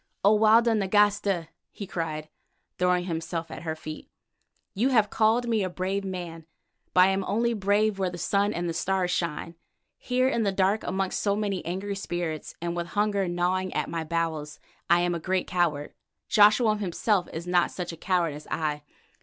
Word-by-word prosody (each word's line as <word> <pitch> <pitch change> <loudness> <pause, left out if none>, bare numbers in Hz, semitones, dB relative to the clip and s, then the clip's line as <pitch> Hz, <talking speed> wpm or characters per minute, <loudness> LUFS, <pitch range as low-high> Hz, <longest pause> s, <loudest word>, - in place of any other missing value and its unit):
"O 210 +2 +6
Walda 225 +2 +5
Nagasta," 200 -4 +2 0.2
he 200 - -8
cried, 155 -4 -4 0.5
throwing 180 0 +2
himself 165 -1 -4
at - - -7
her 160 -2 -3
feet, 155 -1 -9 0.6
"you 230 +7 +1
have 220 -5 +3
called 225 +2 +2
me 225 -3 +1
a 185 - -1
brave 190 +2 -2
man, 175 -4 -6 0.5
but 180 - +7
I 185 - +7
am 195 0 0
only 235 +4 +1
brave 205 0 +1
where 190 -1 +1
the 175 - -7
sun 200 +3 +1
and 175 -3 -3
the 165 - -2
stars 180 +1 0
shine. 170 -2 -2 0.5
Here 255 0 +1
in 235 -3 +1
the 200 -2 +1
dark 195 +2 +1
amongst 190 0 -2
so 200 -1 +1
many 205 -3 -2
angry 195 +3 -3
spirits, 175 -5 -4
and 170 0 -3
with 170 0 -3
hunger 205 -2 +1
gnawing 180 +2 0
at - - -1
my 165 -1 -2
bowels, 160 -2 -3 0.3
I 175 +1 +5
am 175 0 +1
a 170 - -2
great 185 +2 -1
coward; 165 -5 -1 0.3
Joshua 215 +1 +5
himself 200 0 0
is 165 +2 -6
not 180 -1 +2
such 180 -2 -5
a - - -8
coward 170 -2 0
as 150 +1 -10
I. 150 -2 -2
185 Hz, 185 wpm, -27 LUFS, 170-205 Hz, 0.6 s, but